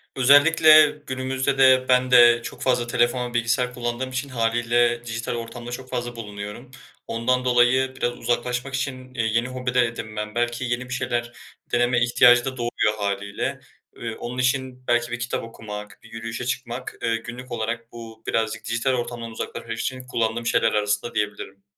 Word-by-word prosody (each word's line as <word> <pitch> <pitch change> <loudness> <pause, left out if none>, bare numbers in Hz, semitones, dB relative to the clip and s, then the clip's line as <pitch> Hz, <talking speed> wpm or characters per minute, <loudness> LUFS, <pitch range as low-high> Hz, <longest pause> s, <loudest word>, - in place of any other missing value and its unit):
Özellikle 155 +3 +7 0.2
günümüzde 130 +1 -1
de 130 -1 +6
ben 125 0 +3
de 120 -1 +7
çok - - -8
fazla 125 -2 +1
telefon, 120 0 0
bilgisayar 120 +1 0
kullandığım 120 +1 -3
için 130 +2 -4
hâliyle 120 0 +1
dijital 115 +1 -3
ortamda 120 +1 -7
çok 130 +1 -7
fazla 120 -1 -4
bulunuyorum. 105 +2 -8 0.4
Ondan 125 +2 0
dolayı 125 +2 +3
biraz 120 -2 -2
uzaklaşmak 125 +2 -2
için, 130 -1 -4
iii, 115 -3 -1
yeni 120 +1 +2
hobi 125 -1 -4
de 125 -1 +4
edinmem 110 -2 -5
belki 120 +1 -1
yeni 120 +1 -3
bir - - -3
şeyler 120 -2 -2 0.4
deneme 120 0 +2
ihtiyacı 120 0 +5
da 130 -1 -4
doğuyor 120 -3 0
hâliyle. 100 0 -3 0.4
Eee, 115 -1 -5
onun 120 +1 -6
için 130 0 -1
belki 120 0 +1
bir 120 - -3
kitap 120 +1 -3
okumak, 105 -2 -9
bir - - -16
yürüyüşe 115 +1 -5
çıkmak, 125 0 -4
eee, 115 0 +1
günlük 120 +2 -9
olarak 115 0 -4
bu 115 -1 -11
birazcık 110 -1 -1
dijital 115 +4 0
ortamdan 120 -2 -4
uzaklaşmak - - -6
için 130 0 -4
kullandığım 115 -1 -1
şeyler 115 -1 +2
arasında 105 +2 -1
diyebilirim. 105 -2 -3
120 Hz, 165 wpm, -23 LUFS, 115-125 Hz, 0.4 s, Özellikle